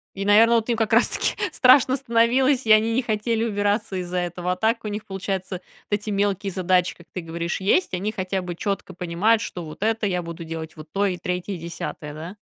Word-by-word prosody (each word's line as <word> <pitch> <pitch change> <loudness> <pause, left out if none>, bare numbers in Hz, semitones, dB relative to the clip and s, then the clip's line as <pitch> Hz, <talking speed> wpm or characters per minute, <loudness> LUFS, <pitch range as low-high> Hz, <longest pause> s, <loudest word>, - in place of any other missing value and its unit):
И, 195 - -3
наверно, 225 +3 +6
вот 225 +1 -1
им 235 - +1
как 225 0 -1
раз 230 +2 +5
таки - - -1 0.2
страшно 255 0 +5
становилось, 255 +1 +2
и 220 - +6
они 220 +1 +4
не 255 - +2
хотели 225 0 -1
убираться 205 -1 0
из-за 180 0 -4
этого, 175 0 -2
а - - -2
так 225 +4 0
у 215 - -3
них, 210 +1 -5
получается, 190 -1 -4 0.3
вот - - -27
эти 210 - -5
мелкие 200 -1 0
задачи, 180 -1 +1
как 170 - -17
ты 185 - -4
говоришь, 170 +1 -4
есть, 200 - +2
они 195 +4 -1
хотя 190 -3 -3
бы 175 -1 -6
чётко 195 0 -3
понимают, 180 +6 +1
что 175 -4 -5
вот 155 +4 -10
это 225 -1 +1
я 180 -2 -1
буду 170 0 -7
делать, 160 -1 -6
вот 155 0 -11
то 200 +1 +1
и 185 -2 -1
3, 180 +2 -3
10, 160 -3 -6
да? 165 +6 -8
195 Hz, 220 wpm, -23 LUFS, 180-225 Hz, 0.3 s, наверно